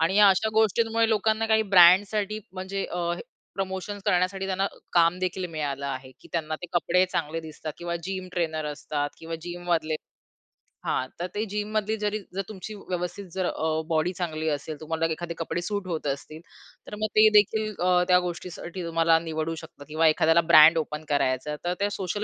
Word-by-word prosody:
आणि 170 +5 +2
या 205 -1 +8
अशा 195 +3 +3
गोष्टींमुळे 225 +1 +3
लोकांना 220 +1 +1
काही 220 0 +4
ब्रँडसाठी 200 +4 +6
म्हणजे 190 +1 -4
अ, 175 -1 -1 0.4
प्रमोशन्स 195 +1 -4
करण्यासाठी 185 +2 +1
त्यांना 195 0 0
अ, - - -4 0.2
काम 170 +1 +4
देखील 185 0 -2
मिळालं 140 -3 -3
आहे, 130 -1 -5
की - - -16
त्यांना 160 -2 -1
ते - - -4
कपडे 180 +1 +3
चांगले 160 +2 -2
दिसतात 155 -1 -7
किंवा 170 0 -3
जिम 185 0 -4
ट्रेनर 160 -3 -1
असतात 145 0 -3
किंवा 165 0 -6
जिममधले 175 -2 -1 0.9
हां, 130 - 0
तर 175 - -2
ते 210 - -1
जिममधली 210 +1 -2
जरी 210 0 -1 0.2
जर 195 - 0
तुमची 205 +1 -7
व्यवस्थित 180 0 -4
जर 190 -1 -1
अ, 160 -1 -1
बॉडी 165 +2 +1
चांगली 160 -3 -3
असेल. 150 +1 -3
तुम्हाला 160 +1 -1
एखादे 170 +1 -4
कपडे 165 +1 -3
सूट 200 +1 -3
होत 160 -4 -3
असतील. 155 +3 -10 0.5
तर - - -6
मग 215 - +2
ते 215 0 +8
देखील 215 +1 +3
अ, 180 0 +3
त्या 180 -1 +6
गोष्टीसाठी 180 0 -6
तुम्हाला 165 0 +3
निवडू 160 0 -3
शकतात 160 -3 -11
किंवा 160 +1 +3
एखाद्याला 160 +2 +4
ब्रँड 160 +2 +9
ओपन 150 -1 -3
करायचं. 145 +1 0
तर 175 - +1
त्या 200 0 +1
सोशल 200 +1 -3
175 Hz, 180 wpm, -26 LUFS, 160-195 Hz, 0.9 s, ब्रँड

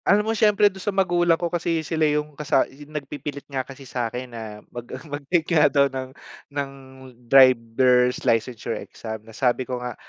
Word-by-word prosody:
Alam 210 +1 +4
mo 225 - 0
siyempre 210 -1 +4
dun 190 - -10
sa 205 - -2
magulang 175 -4 +2
ko 175 - -3
kasi 165 -2 -1
sila 160 -1 +1
yung 150 0 -1
kasa 145 -1 +1
yung 145 +2 -13
nagpipilit 145 0 -6
nga 135 -2 -3
kasi 135 +1 -11
sa 120 -2 -2
akin 125 +1 -7
na 110 -2 -7 0.2
mag 120 -1 -8 0.2
mag-take 150 +3 -1
nga 160 - +5
daw 140 -1 +4
ng 130 -1 -4 0.4
ng 140 -1 -3 0.6
driver's 125 -1 +5
licensure 115 0 0
exam 110 -1 -8
na 110 - -18
sabi 125 +3 0
ko 125 0 -3
nga, 125 0 -5
140 Hz, 185 wpm, -23 LUFS, 125-160 Hz, 0.6 s, nga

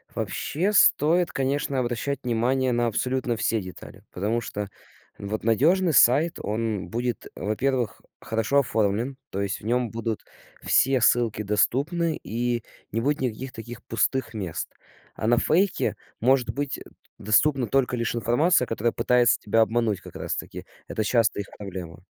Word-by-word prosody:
Вообще 180 +8 -1
стоит, 175 -3 +4
конечно, 135 0 -1
обращать 125 +3 -1
внимание 125 +2 +1
на 120 0 +1
абсолютно 125 +1 -1
все 110 -1 0
детали. 90 -1 -11
Потому 105 +5 0
что 105 -3 -5 0.5
вот 105 +2 -4
надежный 160 - +3
сайт- 145 +8 +4
он 110 -3 -2
будет, 120 +3 -3
во-первых, 120 +2 -1 0.2
хорошо 115 +5 +1
оформлен, 115 +1 0
то 100 - -3
есть 100 -1 -2
в - - -12
нём 120 0 0
будут 115 -1 -3 0.4
все 130 -2 +3
ссылки 115 -3 +3
доступны 145 - +1
и 120 0 -1 0.3
не 115 - 0
будет 145 +3 0
никаких 130 +1 -3
таких 120 +1 -9
пустых 115 +1 -1
мест. 95 -7 -4 0.4
А 110 - -3
на 120 +1 +4
фейке 180 +9 +1 0.2
может 130 +1 +3
быть 145 0 -3 0.4
доступна 130 +4 +2
только 125 +1 +1
лишь 115 0 -1
информация, 125 - +3
которая 115 0 -1
пытается 125 -1 +3
тебя 110 +2 +1
обмануть, 110 -3 +1
как - - -13
раз - - -3
таки. - - -7 0.2
Это 110 - -2
часто 115 -1 +2
их 100 - -8
проблема. 90 -3 -8
120 Hz, 145 wpm, -25 LUFS, 110-135 Hz, 0.5 s, стоит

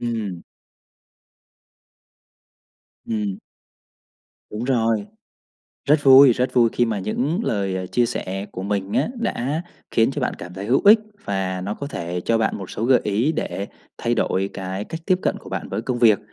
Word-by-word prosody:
Ừm. 110 -7 -3 2.6
Ừm. 105 -4 -2 1.1
Đúng 110 +3 -4
rồi. 115 -5 +1 0.8
Rất 150 - +5
vui 135 -1 +9
rất 125 +2 -1
vui 120 -2 +5
khi 120 - +2
mà 110 -3 -1
những 130 - -1
lời, 100 - -1
ờ, 95 0 -3
chia 120 +5 +1
sẻ 95 -2 -4
của 95 - -5
mình 100 0 -2
á - - +1
đã 155 - -2 0.3
khiến 115 +3 +3
cho 145 - -4
bạn 125 - -1
cảm 90 +1 -9
thấy 95 +1 -6
hữu 125 +5 +3
ích 215 +2 +9 0.3
và 95 -2 -2
nó 100 +3 -3
có 140 - -6
thể 90 - -4
cho 115 - +2
bạn 110 - 0
một 95 - -8
số 110 - -3
gợi 125 +1 +5
ý 110 +9 +1
để 100 -9 -3 0.3
thay 120 0 0
đổi 95 -3 0
cái 95 +1 -4
cách 165 - -7
tiếp 185 -2 +3
cận - - 0
của - - -13
bạn - - -4
với - - -3
công 120 0 -2
việc. 110 -4 +5
110 Hz, 175 wpm, -22 LUFS, 95-125 Hz, 2.6 s, vui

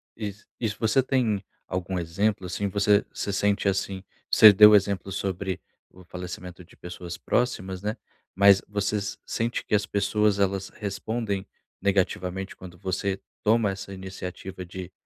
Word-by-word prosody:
e 105 -2 -4 0.3
e 115 - 0
se 105 - -6
você 110 +4 +3
tem 115 -7 0 0.2
algum 90 0 -3
exemplo, 95 +4 0
assim? 90 +3 -2
Você 100 +1 +3
você 100 - -3
sente, 100 0 +1
assim, 95 0 -1 0.3
você 105 -2 +9
deu 105 +1 +9
exemplos 100 -1 +1
sobre 95 -1 -2 0.3
o 95 - -16
falecimento 90 0 -8
de - - -20
pessoas 90 0 -7
próximas, 95 -7 -1
né. 105 +1 -3 0.4
Mas 100 0 +6
você 105 +1 -1 0.3
sente 115 +1 -2
que - - -5
as 105 0 +1
pessoas, 105 0 +1
elas 95 -1 0
respondem 105 0 -3 0.4
negativamente 95 -1 0
quando 90 -1 -11
você 95 +2 -2 0.2
toma 110 -2 +3
essa 100 0 -7
iniciativa 95 0 -7
de 90 0 -8
100 Hz, 145 wpm, -26 LUFS, 95-105 Hz, 0.4 s, você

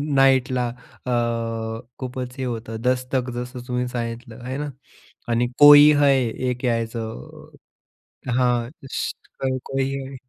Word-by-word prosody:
नाईटला 130 -2 +3 0.4
अ, 125 - -2 0.9
खूपच 125 -1 -5
हे 130 - -3
होतं, 115 -2 -4
दस्तक 125 0 0
जसं 125 +1 -5
तुम्ही 125 0 -1
सांगितलं 120 -1 -6
हे 130 +2 -3
ना. 150 0 -3 0.6
आणि 120 +1 +2
कोई 145 0 +10
है, 145 -1 +5 0.4
एक 125 +1 -3
यायचं 115 -1 -4 0.9
हां. 120 -2 +1 0.2
श, - - -2 0.5
कोई 135 0 -1
है. 135 0 -6
125 Hz, 115 wpm, -23 LUFS, 120-130 Hz, 0.9 s, कोई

